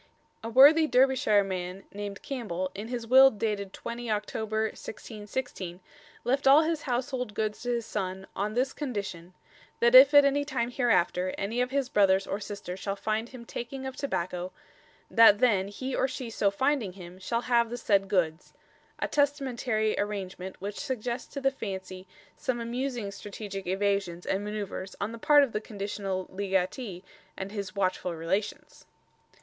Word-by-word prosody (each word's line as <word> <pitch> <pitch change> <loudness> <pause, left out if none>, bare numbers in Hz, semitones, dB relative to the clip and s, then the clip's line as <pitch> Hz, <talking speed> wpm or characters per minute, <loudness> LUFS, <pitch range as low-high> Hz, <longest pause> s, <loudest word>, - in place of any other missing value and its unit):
A 225 - -4
worthy 290 +7 +7
Derbyshire 255 -5 +4
man 185 0 -5
named 200 0 -6
Campbell, 185 -9 -3
in 205 +3 -6
his 240 -1 -4
will 265 +3 +8
dated 205 -3 -3
20 235 +2 -6
October 220 +1 -1
1616, 210 -5 -6 0.4
left 270 +3 +1
all 285 +4 +8
his 320 0 -1
household 250 -3 -2
goods 215 -1 -2
to 245 - -4
his 235 -2 -1
son, 190 -2 -4
"on 210 +2 -2
this 260 +2 +1
condition 195 - -5 0.4
that 235 +1 +4
yf 265 +2 +10
at 285 0 +9
any 280 +1 +2
time 255 -4 -2
hereafter, 185 -7 +1
any 225 +5 -1
of 250 - 0
his 275 -1 0
brothers 195 -4 +3
or 195 - -3
sisters 200 -3 -6
shall 195 0 -3
fynd 220 +3 -2
him 250 -2 -11
takeing 260 +4 -6
of 265 -1 -5
tobacco, 180 -9 -3 0.6
that 225 -3 +8
then 205 -5 +3
he 255 +6 -4
or - - +2
she 260 -4 -6
so 205 -2 +2
fynding 230 -2 0
him, 180 -1 -11
shall 230 +5 -1
have 235 -2 +2
the 240 - -4
said 200 -4 +2
goods" 175 -4 -1 0.4
a - - -1
testamentary 260 -6 0
arrangement 190 -2 -4
which 200 +2 -5
suggests 250 -2 -4
to 280 - -4
the 270 0 +2
fancy 190 -5 -6 0.3
some 255 -2 -2
amusing 240 -2 -3
strategic 200 -1 -7
evasions 195 -2 -1
and 195 - 0
manœuvres 200 -2 -5
on 205 +2 -2
the 230 - -8
part 290 +4 +6
of 270 - -1
the 210 - -2
conditional 200 -3 -4
legatee 190 +1 -2 0.3
and 190 +1 -5
his 200 -3 -5
watchful 185 -2 -1
relations. 190 +6 -3
215 Hz, 165 wpm, -28 LUFS, 195-250 Hz, 0.6 s, yf